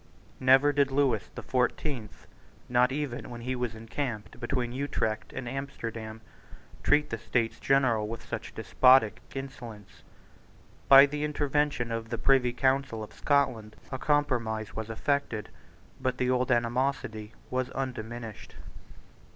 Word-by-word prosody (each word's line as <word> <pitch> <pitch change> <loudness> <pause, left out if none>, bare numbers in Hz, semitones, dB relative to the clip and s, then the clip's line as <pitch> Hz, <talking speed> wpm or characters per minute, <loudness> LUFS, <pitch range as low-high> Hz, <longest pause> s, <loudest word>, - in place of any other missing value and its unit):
Never 135 +3 +5
did 140 -1 +3
Lewis 135 -6 +1
the - - -6
Fourteenth, 125 -2 -2 0.4
not 125 +1 +3
even 140 -3 -3
when 120 -1 -8
he 130 +2 -2
was 125 -2 -3
encamped 115 0 -5
between 120 -1 -2
Utrecht 125 -5 -2
and 125 - -6
Amsterdam, 115 -4 -5 0.6
treat 150 0 +3
the 115 - -3
States 115 0 -1
General 130 -6 +2
with 115 +1 -7
such - - -6
despotic 125 -3 +4 0.2
insolence, 120 -6 -8 0.9
By 135 0 +11
the 150 +1 -3
intervention 145 -4 0
of 115 0 -3
the - - -2
Privy 130 -3 +3
Council 130 -3 0
of 105 - -10
Scotland 115 -7 0 0.2
a 130 - -3
compromise 120 -8 0
was 110 0 -4
effected: 120 -2 -1 0.5
but 130 -1 -1
the 125 0 +1
old 125 0 +1
animosity 120 -3 0 0.2
was 130 0 -1
undiminished. 120 -4 -6
125 Hz, 130 wpm, -29 LUFS, 115-135 Hz, 0.9 s, By